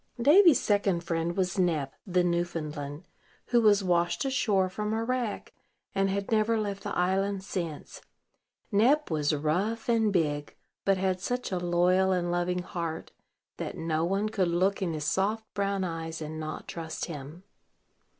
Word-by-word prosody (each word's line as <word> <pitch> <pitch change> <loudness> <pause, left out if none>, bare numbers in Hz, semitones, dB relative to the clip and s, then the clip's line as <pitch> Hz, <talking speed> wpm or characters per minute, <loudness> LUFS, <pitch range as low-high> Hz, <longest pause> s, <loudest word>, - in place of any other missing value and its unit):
Davy's 310 - +7
second 200 -4 +1
friend 170 +1 -2
was 185 0 0
Nep, 155 -7 +1
the 180 -1 +2
Newfoundland, 165 -3 -3 0.4
who 240 -1 +4
was 205 -2 +5
washed 175 +4 +1
ashore 220 -8 +2
from 210 +3 -3
a 225 +1 0
wreck, 245 -2 -2 0.4
and 195 0 +1
had 200 +2 -2
never 220 +1 +2
left 200 -2 -3
the 205 - -4
island 190 +2 +1
since. 170 -6 -5 0.7
Nep 245 - +3
was 150 -1 +1
rough 175 +10 -1
and 225 -3 +3
big, 150 -5 -1 0.3
but 195 -1 +3
had 185 -1 0
such 245 +3 -2
a 185 - 0
loyal 180 +2 +3
and 175 -1 0
loving 175 +1 0
heart 170 -3 -5 0.5
that - - -5
no 160 -1 -1
one 195 +4 0
could 195 -4 +1
look 185 +4 +1
in 175 -4 -1
his 150 -1 -4
soft 210 +6 0
brown 200 -1 0
eyes 165 -2 -4
and 155 0 -6
not 155 0 -6
trust 160 -2 -5
him. 155 +2 -8
185 Hz, 160 wpm, -28 LUFS, 165-205 Hz, 0.7 s, Davy's